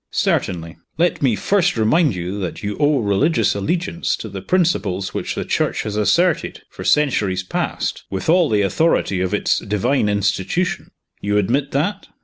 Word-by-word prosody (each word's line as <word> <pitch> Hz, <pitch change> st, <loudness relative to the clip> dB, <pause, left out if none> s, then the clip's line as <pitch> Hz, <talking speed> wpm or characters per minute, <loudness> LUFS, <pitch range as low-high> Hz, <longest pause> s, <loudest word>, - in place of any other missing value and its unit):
"Certainly. 85 Hz, -3 st, -1 dB, 0.2 s
Let 170 Hz, 0 st, +1 dB
me 130 Hz, -6 st, +3 dB
first 190 Hz, -, +1 dB
remind 130 Hz, -, +3 dB
you 90 Hz, +3 st, -4 dB
that 90 Hz, +1 st, -5 dB
you 105 Hz, 0 st, -2 dB
owe 145 Hz, -2 st, +3 dB
religious 100 Hz, +10 st, +2 dB
allegiance 170 Hz, -, -1 dB
to -, -, -8 dB
the -, -, -7 dB
principles 105 Hz, -, 0 dB
which -, -, -3 dB
the -, -, -3 dB
Church -, -, 0 dB
has 105 Hz, -1 st, -4 dB
asserted, 150 Hz, -, +1 dB
for -, -, -8 dB
centuries 105 Hz, -11 st, +1 dB
past, 95 Hz, -, -3 dB
with 95 Hz, -1 st, -4 dB
all 170 Hz, 0 st, +4 dB
the 105 Hz, -2 st, +2 dB
authority 100 Hz, -, +1 dB
of 95 Hz, -, -1 dB
its 105 Hz, -, +1 dB
divine 105 Hz, +3 st, 0 dB
institution. 100 Hz, -, -1 dB, 0.3 s
You 105 Hz, +1 st, 0 dB
admit 130 Hz, +8 st, +1 dB
that?" 160 Hz, +9 st, -1 dB
105 Hz, 160 wpm, -20 LUFS, 100-160 Hz, 0.3 s, all